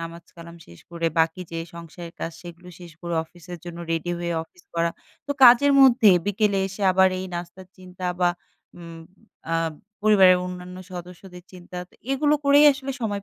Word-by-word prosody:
নামাজ-কালাম 170 Hz, 0 st, -10 dB
শেষ 85 Hz, -, -16 dB
করে 170 Hz, -1 st, -2 dB
বাকি 160 Hz, +2 st, +1 dB
যে 165 Hz, -, -3 dB, 0.2 s
সংসারের 170 Hz, 0 st, -10 dB
কাজ 165 Hz, -, -4 dB
সেগুলো 175 Hz, 0 st, -12 dB
শেষ 175 Hz, -2 st, -11 dB
করে, 170 Hz, -1 st, -4 dB
অফিসের 175 Hz, +1 st, -12 dB
জন্য 170 Hz, -1 st, -8 dB
রেডি 165 Hz, +1 st, -2 dB
হয়ে 170 Hz, 0 st, -3 dB
অফিস 175 Hz, +2 st, -24 dB
করা। 170 Hz, 0 st, +1 dB, 0.4 s
তো 285 Hz, -, -6 dB
কাজের 250 Hz, +4 st, +7 dB
মধ্যে 240 Hz, -5 st, +6 dB, 0.2 s
বিকেলে 205 Hz, 0 st, +1 dB
এসে 195 Hz, +2 st, -8 dB
আবার 190 Hz, 0 st, +5 dB
এই 185 Hz, -, -5 dB
নাস্তার 175 Hz, +2 st, -8 dB
চিন্তা 185 Hz, 0 st, -8 dB
বা 175 Hz, -1 st, +4 dB, 0.5 s
উম 170 Hz, -1 st, -10 dB, 0.5 s
আ -, -, +2 dB, 0.5 s
পরিবারের 195 Hz, -4 st, +6 dB
অন্যান্য 180 Hz, 0 st, -8 dB, 0.2 s
সদস্যদের 180 Hz, +1 st, -10 dB
চিন্তা। 180 Hz, 0 st, -12 dB
তা -, -, -28 dB, 0.2 s
এগুলো 290 Hz, +2 st, +2 dB
করেই 285 Hz, +1 st, +6 dB
আসলে 275 Hz, 0 st, -6 dB
সময় 205 Hz, -3 st, -3 dB
180 Hz, 170 wpm, -23 LUFS, 170-200 Hz, 0.5 s, কাজের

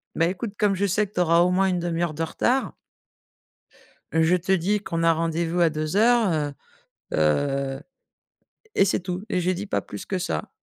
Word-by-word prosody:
beh 165 Hz, -, +2 dB
écoute, 195 Hz, +3 st, -5 dB
comme 205 Hz, -2 st, +2 dB
je 200 Hz, +2 st, 0 dB
sais 200 Hz, +2 st, +1 dB
que 205 Hz, -, -28 dB
tu -, -, -1 dB
auras 170 Hz, -1 st, +4 dB
au 180 Hz, -, +4 dB
moins 190 Hz, +1 st, +2 dB
une 180 Hz, -2 st, 0 dB
1/2 170 Hz, -1 st, -1 dB
de 160 Hz, -, -5 dB
retard 255 Hz, +10 st, 0 dB, 1.4 s
je 160 Hz, +2 st, +3 dB
te 180 Hz, +2 st, -1 dB
dis 190 Hz, +3 st, +1 dB
qu'on 165 Hz, -4 st, -3 dB
a 165 Hz, 0 st, +5 dB
rendez-vous 165 Hz, +1 st, -1 dB
à 170 Hz, -2 st, +4 dB
14:00, 200 Hz, +7 st, +2 dB
heu 150 Hz, -2 st, -1 dB, 0.7 s
heu» 135 Hz, -, +1 dB, 1.0 s
et -, -, +6 dB
c'est 195 Hz, -, +1 dB
tout 180 Hz, +1 st, -5 dB
et 180 Hz, -, 0 dB
j'ai 180 Hz, +1 st, +1 dB
dit 195 Hz, +3 st, -5 dB
pas -, -, -1 dB
plus -, -, -9 dB
que 190 Hz, -, -2 dB
ça 80 Hz, -, -3 dB
175 Hz, 190 wpm, -24 LUFS, 160-195 Hz, 1.4 s, et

